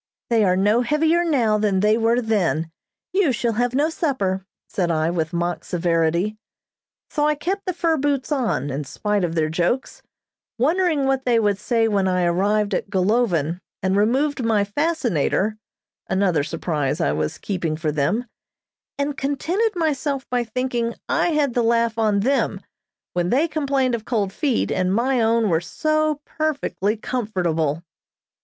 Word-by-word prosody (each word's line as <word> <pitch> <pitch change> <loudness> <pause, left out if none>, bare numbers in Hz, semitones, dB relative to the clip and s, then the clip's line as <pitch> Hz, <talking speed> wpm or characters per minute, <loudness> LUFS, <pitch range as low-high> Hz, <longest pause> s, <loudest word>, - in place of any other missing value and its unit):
They 225 -2 +4
are 185 -2 +3
no 210 +5 +3
heavier 315 +6 +2
now 240 -10 +2
than 205 -3 +1
they 210 +1 +4
were 230 +2 +2
then. 175 -7 0 0.4
You 380 -7 +3
shall 235 -1 0
have 245 +3 0
no 300 +4 +2
supper," 195 - -1 0.2
said 180 -3 -1
I, 160 0 +1
with 165 -2 -1
mock 175 -1 -2
severity. 170 +4 0 0.7
So 295 -1 +1
I 300 - +2
kept 385 +7 -3
the 365 - 0
fur 330 -2 +1
boots 280 0 -1
on, 225 - 0
in 140 +3 -3
spite 210 +7 -1
of 170 -1 -1
their 155 -2 +2
jokes, 175 - -1 0.6
wondering 315 +2 +2
what 270 -1 0
they 240 -2 +3
would 205 -2 +1
say 230 -2 +1
when 200 -3 +1
I 180 -1 +1
arrived 200 +4 +1
at 190 - -2
Golovin 185 -5 +1 0.2
and 190 0 +1
removed 260 +7 +1
my 220 -3 +2
fascinator 215 - 0 0.5
(another 185 -6 +2
surprise 155 -3 -2
I 70 - +1
was 75 +1 -2
keeping 175 -6 -2
for 155 -1 -1
them), 155 - 0 0.7
and 285 0 -1
contented 345 - -1
myself 290 -4 -1
by 245 -1 +1
thinking 240 0 -2
I - - +2
had 300 -6 +1
the 245 - +2
laugh 230 -1 +1
on 210 -2 +2
them, 235 -5 0 0.5
when 175 0 0
they 285 - +3
complained 275 -5 0
of 225 -2 -3
cold 205 -5 -1
feet, 275 -3 0
and 185 0 +1
my 250 +2 +2
own 225 0 +2
were 165 -3 +2
so 310 - 0
perfectly 285 -9 -1
comfortable. 175 - -1
225 Hz, 160 wpm, -22 LUFS, 185-275 Hz, 0.7 s, They